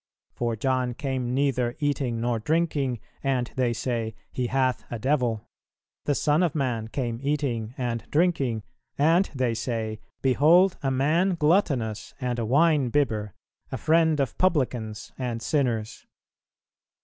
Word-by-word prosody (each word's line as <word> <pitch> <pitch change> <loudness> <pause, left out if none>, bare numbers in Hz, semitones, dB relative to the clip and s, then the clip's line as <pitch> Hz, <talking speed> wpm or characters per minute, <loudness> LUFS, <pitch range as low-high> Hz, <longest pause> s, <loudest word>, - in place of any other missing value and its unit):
For 120 -1 -1
John 125 +1 0
came 130 -4 -2
neither 125 -3 +1
eating 140 -6 -1
nor 120 0 0
drinking, 145 -3 0 0.2
and 130 -3 0
they 125 -2 +1
say, 115 -1 -2 0.2
He 125 -1 -2
hath 130 0 +1
a 120 - -4
devil. 120 -3 0 0.6
The 145 - +1
Son 150 +4 +2
of 170 -4 +1
man 125 -6 -1
came 120 -1 -3
eating 135 -5 -1
and 120 -2 -3
drinking, 140 - +1 0.3
and 165 +6 +3
they 125 -3 +1
say, 110 -2 -3 0.2
Behold 160 +8 +5
a 135 - 0
man 155 +8 +2
gluttonous 150 - +1
and 125 -2 -2
a 115 - -1
winebibber, 135 - +2 0.4
a - - -2
friend 160 -1 +3
of 135 -5 0
publicans 125 - 0
and 120 -3 -2
sinners." 115 -4 -1
130 Hz, 135 wpm, -26 LUFS, 115-145 Hz, 0.6 s, Behold